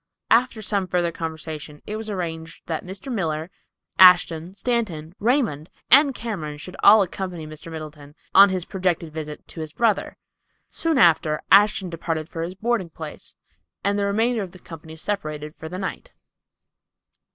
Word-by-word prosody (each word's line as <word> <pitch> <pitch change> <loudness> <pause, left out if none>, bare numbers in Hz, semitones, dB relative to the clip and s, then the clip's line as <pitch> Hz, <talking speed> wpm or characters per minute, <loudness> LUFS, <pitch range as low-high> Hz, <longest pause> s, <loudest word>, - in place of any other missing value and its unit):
After 230 -1 +3
some 200 -3 0
further 175 -2 0
conversation 155 -2 -6
it 210 - -4
was 220 0 -5
arranged 165 -4 -5
that 160 -2 -3
Mr. 190 +8 -7
Miller, 160 -4 -2 0.5
Ashton, 180 -1 +6
Stanton, 200 -10 -2
Raymond 220 - 0 0.2
and 275 0 +7
Cameron 165 -12 -5
should 170 +5 -9
all 210 0 +8
accompany 180 -3 -5
Mr. 155 +2 -10
Middleton 150 -2 -9 0.2
on 200 +1 +9
his 185 -2 -2
projected 175 -4 -2
visit 150 -1 -7
to - - -8
his 155 -1 -6
brother. 230 -3 0 0.5
Soon 325 -3 0
after 160 -7 +4
Mr. - - -7
Ashton 200 -1 +5
departed 165 -1 -3
for 165 - -5
his 175 +3 -4
boarding 220 -3 -1
place, 155 -1 -8 0.5
and 200 0 +1
the 200 - +1
remainder 225 +3 +1
of 185 -3 -7
the - - -11
company 160 -2 -11
separated 155 -5 -4
for 160 - -8
the 180 - -6
night. 195 - -6
180 Hz, 160 wpm, -23 LUFS, 160-205 Hz, 0.5 s, on